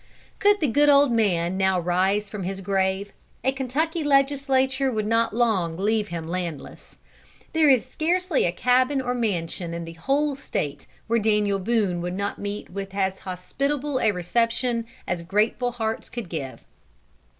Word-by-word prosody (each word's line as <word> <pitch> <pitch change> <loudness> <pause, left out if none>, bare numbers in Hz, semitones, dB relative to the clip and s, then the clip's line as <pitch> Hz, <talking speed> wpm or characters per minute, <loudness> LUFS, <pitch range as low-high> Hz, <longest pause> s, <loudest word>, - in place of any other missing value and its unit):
Could 410 -1 +4
the 300 - +3
good 290 +4 +4
old 280 -2 +6
man 190 -6 +1
now 190 -1 +2
rise 190 +4 +1
from 210 -1 -6
his 190 +1 -4
grave, 190 +1 -1 0.3
a 265 - +3
Kentucky 295 +5 -1
Legislature 275 -1 +2
would 215 -3 -1
not 230 +1 +2
long 195 -9 +1
leave 210 +2 +1
him 170 -3 -5
landless. 170 -4 -6 0.6
There 320 -2 +4
is 255 -3 +4
scarcely 340 +4 0
a - - 0
cabin 255 +7 +2
or 250 -2 -2
a - - +1
mansion 175 -6 -2
in 170 0 -5
the 165 - -8
whole 275 - 0
State, 145 - -4 0.2
where 230 +1 +2
Daniel 210 -2 +2
Boone 195 -4 0
would 180 +1 -3
not 200 +1 -3
meet 205 -1 -5
with 195 +1 -6
as 190 -1 0
hospitable 270 +10 -2
a 225 - +3
reception 230 +5 0 0.2
as 175 -1 -1
grateful 215 +7 0
hearts 225 -2 -3
could 230 -7 -6
give. 140 -6 -5
215 Hz, 160 wpm, -24 LUFS, 185-265 Hz, 0.6 s, old